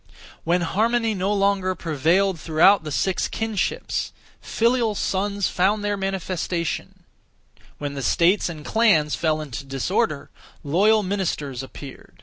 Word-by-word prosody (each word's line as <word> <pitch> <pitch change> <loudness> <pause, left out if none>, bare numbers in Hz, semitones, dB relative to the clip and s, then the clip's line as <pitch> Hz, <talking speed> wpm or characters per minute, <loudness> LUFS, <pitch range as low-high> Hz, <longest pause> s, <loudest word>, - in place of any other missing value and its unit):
When 175 +2 +1
harmony 225 +5 +1
no 190 0 -1
longer 195 -2 +1
prevailed 170 +4 +1
throughout 165 +5 +4
the 155 - -6
six 185 +5 0
kinships, 220 -3 -2 0.3
filial 230 -2 +1
sons 200 0 -1
found 205 +3 +1
their 205 0 0
manifestation; 185 -3 -3 0.7
when 145 -1 -4
the 140 - -5
states 175 +8 +2
and 155 -3 -8
clans 175 -10 +3
fell 155 -1 0
into 140 -2 -6
disorder, 135 -1 -2 0.3
loyal 205 +8 +3
ministers 170 -9 -2
appeared. 135 +1 -11
185 Hz, 125 wpm, -23 LUFS, 155-205 Hz, 0.7 s, throughout